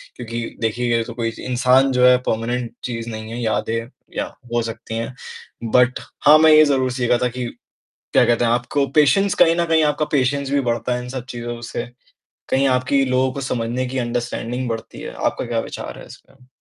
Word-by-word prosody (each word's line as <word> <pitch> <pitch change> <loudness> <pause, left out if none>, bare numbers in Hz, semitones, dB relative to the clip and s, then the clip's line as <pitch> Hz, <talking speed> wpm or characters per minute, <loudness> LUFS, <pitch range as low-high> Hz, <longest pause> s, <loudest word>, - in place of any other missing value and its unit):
क्योंकि 115 -1 -5
देखिए 120 +1 0
ये 115 - +1
तो 120 - -8
कोई 115 -1 -2
इंसान 130 +2 +3
जो 125 -1 +4
है 125 0 +7
परमानेंट 115 +1 -1
चीज़ 115 -1 -4
नहीं 110 0 -6
है, 120 - -5
यादें 110 0 -1
हैं 115 +2 -9 0.3
या - - 0 0.3
हो 120 - +2
सकती 115 0 -6
हैं। 115 +3 -4 0.6
बट 125 0 +4 0.3
हाँ, 150 +1 +9
मैं 160 0 +6
ये 155 0 +8
ज़रूर 130 -3 +1
सीखा 120 -1 +1
था 125 - +3
कि 125 0 -5 0.7
क्या - - +5
कहते 120 0 +2
हैं 115 - +2
आपको 130 +4 0
पेशेंस 195 +7 +4
कहीं 165 +1 +4
न 170 - +2
कहीं 160 -1 +3
आपका 150 +1 +1
पेशेंस 140 0 +1
भी 140 0 +2
बढ़ता 120 -1 -1
है 125 - -3
इन 125 - -8
सब 130 -1 -5
चीज़ों 120 -1 -6
से। 120 - -3 0.6
कहीं 135 +1 +2
आपकी 130 +2 +2
लोगों 130 0 +1
को 140 - -5
समझने 125 -1 -2
की 130 - -4
अंडरस्टैंडिंग 120 +1 -3
बढ़ती 115 -1 -6
है। - - -6
आपका - - -2
क्या - - -1
विचार - - -6
है - - -10
इसमें? 130 -2 -17
125 Hz, 205 wpm, -20 LUFS, 120-135 Hz, 0.7 s, हाँ